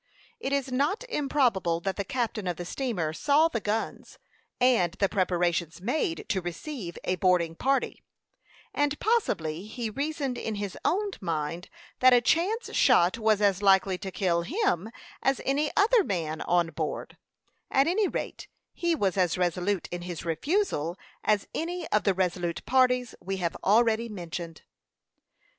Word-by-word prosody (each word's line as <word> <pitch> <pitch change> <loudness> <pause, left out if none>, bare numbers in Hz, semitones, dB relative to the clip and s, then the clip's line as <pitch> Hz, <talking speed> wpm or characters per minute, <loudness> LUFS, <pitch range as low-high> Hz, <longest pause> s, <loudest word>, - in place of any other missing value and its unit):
It 270 - -3
is 275 -2 0
not 290 - 0
improbable 250 - +1
that 195 +1 -2
the 200 - -2
captain 220 -2 -2
of 175 -2 -2
the 175 - -5
steamer 180 - -2
saw 295 - +3
the 235 - -2
guns 215 +2 -3 0.4
and 235 -9 +3
the 195 +1 +1
preparations 175 -3 0
made 195 - -1
to 190 - +1
receive 175 - -6
a 185 - 0
boarding 180 -3 +2
party, 270 +10 0 0.7
and 290 0 0
possibly 190 - 0
he 225 0 -4
reasoned 280 0 -2
in 220 - -3
his 200 -2 -4
own 405 +2 +1
mind 165 -1 -3 0.3
that 255 -1 +7
a - - +6
chance 360 - 0
shot 230 -5 +4
was 215 -2 +2
as 200 -1 +3
likely 190 -2 +4
to 195 - -5
kill 180 -3 0
him 220 - 0 0.3
as 270 0 +1
any 290 +2 +1
other 435 +2 +5
man 160 - -2
on 175 -2 +1
board; 155 -1 -4 0.5
at 270 - +3
any 385 +5 +2
rate, - - -5 0.3
he 340 -1 0
was 200 - 0
as 180 -2 +2
resolute 180 +2 0
in 175 0 -4
his 175 -2 -6
refusal 170 - 0 0.3
as 210 -2 +1
any 345 +1 -3
of 210 - +1
the 195 -2 +3
resolute 175 -2 -1
parties 250 -1 +2
we 195 +2 -3
have 170 -3 -2
already 225 +2 +3
mentioned. 170 -4 -7
205 Hz, 155 wpm, -28 LUFS, 175-275 Hz, 0.7 s, that